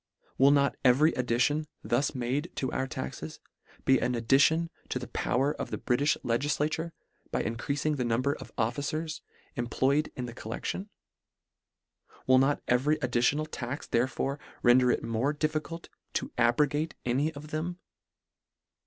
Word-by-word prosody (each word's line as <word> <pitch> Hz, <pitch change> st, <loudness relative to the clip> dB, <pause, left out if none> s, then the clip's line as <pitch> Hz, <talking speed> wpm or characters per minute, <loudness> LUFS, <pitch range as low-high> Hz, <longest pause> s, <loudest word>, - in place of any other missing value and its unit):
Will 135 Hz, +1 st, +7 dB
not 140 Hz, -1 st, +3 dB
every 140 Hz, +5 st, +5 dB
ad 125 Hz, -1 st, -2 dB
dition, 145 Hz, +6 st, +2 dB, 0.2 s
thus 135 Hz, +4 st, 0 dB
made 130 Hz, +6 st, -1 dB
to 130 Hz, -, -2 dB
our 130 Hz, -, -1 dB
taxes, 65 Hz, -, -6 dB, 0.5 s
be 130 Hz, -1 st, +5 dB
an 125 Hz, -, 0 dB
addition 140 Hz, +8 st, +3 dB, 0.2 s
to -, -, -1 dB
the 125 Hz, -, -5 dB
power 135 Hz, +4 st, 0 dB
of -, -, -5 dB
the -, -, -3 dB
Britifh 140 Hz, +3 st, +1 dB
legislature, 145 Hz, +6 st, 0 dB, 0.4 s
by -, -, -1 dB
increafing 140 Hz, +6 st, -1 dB
the 125 Hz, -, 0 dB
number 120 Hz, +4 st, +1 dB
of -, -, -10 dB
officers 145 Hz, +7 st, -2 dB, 0.3 s
employ 130 Hz, +4 st, +1 dB
ed 150 Hz, -, -3 dB
in 125 Hz, -, -4 dB
the 120 Hz, -, -7 dB
collection? 120 Hz, -, -5 dB, 1.4 s
Will 130 Hz, 0 st, +6 dB
not 135 Hz, +2 st, +2 dB
every 135 Hz, +5 st, +3 dB
additi 125 Hz, -1 st, +2 dB
onal 155 Hz, 0 st, -2 dB
tax 130 Hz, +3 st, -4 dB
therefore 130 Hz, +3 st, 0 dB, 0.2 s
render 125 Hz, +1 st, +6 dB
it -, -, +1 dB
more 120 Hz, +6 st, 0 dB
diffi 155 Hz, +1 st, 0 dB
cult 165 Hz, +2 st, -9 dB, 0.3 s
to -, -, -2 dB
abrogate 145 Hz, +6 st, +2 dB
any 135 Hz, +6 st, +1 dB
of 150 Hz, +1 st, -9 dB
them 165 Hz, +3 st, -3 dB
135 Hz, 155 wpm, -29 LUFS, 125-150 Hz, 1.4 s, Will